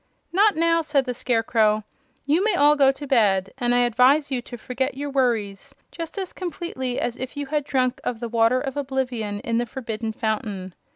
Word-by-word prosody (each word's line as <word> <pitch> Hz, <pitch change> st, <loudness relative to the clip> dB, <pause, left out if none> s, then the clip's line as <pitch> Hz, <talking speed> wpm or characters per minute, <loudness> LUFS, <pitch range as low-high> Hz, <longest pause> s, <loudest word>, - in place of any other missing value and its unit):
"Not 410 Hz, +3 st, +4 dB
now," 330 Hz, +1 st, +3 dB
said 290 Hz, -4 st, +1 dB
the 250 Hz, -, -2 dB
Scarecrow. 225 Hz, -3 st, +1 dB, 0.4 s
"You 310 Hz, +7 st, +2 dB
may 430 Hz, -3 st, +2 dB
all 295 Hz, -2 st, +5 dB
go 275 Hz, -2 st, +5 dB
to 285 Hz, +2 st, -8 dB
bed, 200 Hz, -8 st, +2 dB
and 245 Hz, -1 st, +2 dB
I 245 Hz, -, +4 dB
advise 255 Hz, +5 st, +3 dB
you 255 Hz, -2 st, -1 dB
to 240 Hz, 0 st, -9 dB
forget 260 Hz, +3 st, -3 dB
your 285 Hz, 0 st, -4 dB
worries 245 Hz, -1 st, -1 dB, 0.2 s
just 330 Hz, +3 st, -7 dB
as 380 Hz, -2 st, -4 dB
completely 340 Hz, -8 st, -4 dB
as 240 Hz, +1 st, -2 dB
if 260 Hz, +3 st, -6 dB
you 285 Hz, -, -2 dB
had 295 Hz, +1 st, -1 dB
drunk 255 Hz, -2 st, 0 dB
of 235 Hz, -, -3 dB
the 235 Hz, -, -4 dB
Water 230 Hz, +2 st, +3 dB
of 270 Hz, 0 st, -4 dB
Oblivion 250 Hz, -7 st, -2 dB
in 230 Hz, 0 st, 0 dB
the 240 Hz, -, -2 dB
Forbidden 225 Hz, -3 st, -4 dB
Fountain. 210 Hz, -4 st, -3 dB
255 Hz, 195 wpm, -23 LUFS, 230-285 Hz, 0.4 s, all